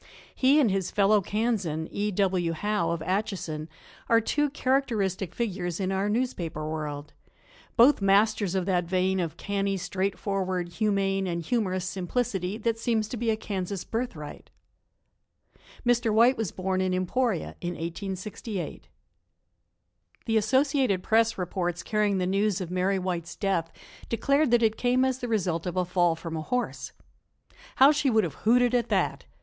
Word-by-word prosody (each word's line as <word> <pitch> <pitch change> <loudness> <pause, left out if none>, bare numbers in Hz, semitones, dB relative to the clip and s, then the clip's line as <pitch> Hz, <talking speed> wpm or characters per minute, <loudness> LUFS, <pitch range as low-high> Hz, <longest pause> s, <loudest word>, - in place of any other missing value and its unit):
He 275 +3 +4
and 245 -9 +3
his 190 -2 -1
fellow 205 +1 +3
Kansan, 195 -7 -1
E. 205 +1 -1
W. 185 -4 +1
Howe 205 0 -1
of 165 -1 -2
Atchison, 180 -5 -2 0.4
are 230 - +6
two 295 +6 0
characteristic 220 - 0
figures 185 -6 -2
in 190 -1 -1
our 195 +2 0
newspaper 180 -10 -2
world, 150 -1 -5 0.6
both 250 +1 +6
masters 200 -1 +3
of 185 -2 0
that 180 -2 +1
vein 185 +2 +1
of 170 -2 -3
canny, 200 -1 -1
straightforward, 185 -1 -2
humane 195 -1 0
and 170 -1 -2
humorous 185 -2 -1
simplicity 190 +1 -2
that 225 0 -1
seems 225 -2 0
to 250 - -4
be 235 0 -1
a 220 - +1
Kansas 195 -3 -4
birthright. 225 -11 -5 1.4
Mr. 240 -1 +2
White 235 +4 +5
was 220 -6 -2
born 185 0 -1
in 185 -1 0
Emporia 195 +2 -1
in 175 0 -3
1868. 190 +3 -5 1.4
THE 225 - 0
Associated 260 -3 +2
Press 225 0 +2
reports 175 -1 -2
carrying 210 -2 +1
the 180 - 0
news 195 +1 +1
of 180 -2 -5
Mary 185 +2 +1
White's 180 -2 -3
death 170 -5 -1 0.4
declared 275 +5 +2
that 235 0 +4
it 220 -1 +2
came 250 +1 +2
as 260 -1 -1
the 245 - -4
result 180 -7 -1
of 180 +1 -3
a 180 - +2
fall 175 -2 +2
from 165 0 -6
a 160 - -3
horse. 245 +10 -3 0.8
How 270 +2 +7
she 295 -2 +1
would 220 -3 +3
have - - -3
hooted 245 +2 +4
at 240 -2 +1
that! - - 0
195 Hz, 155 wpm, -27 LUFS, 180-225 Hz, 1.4 s, How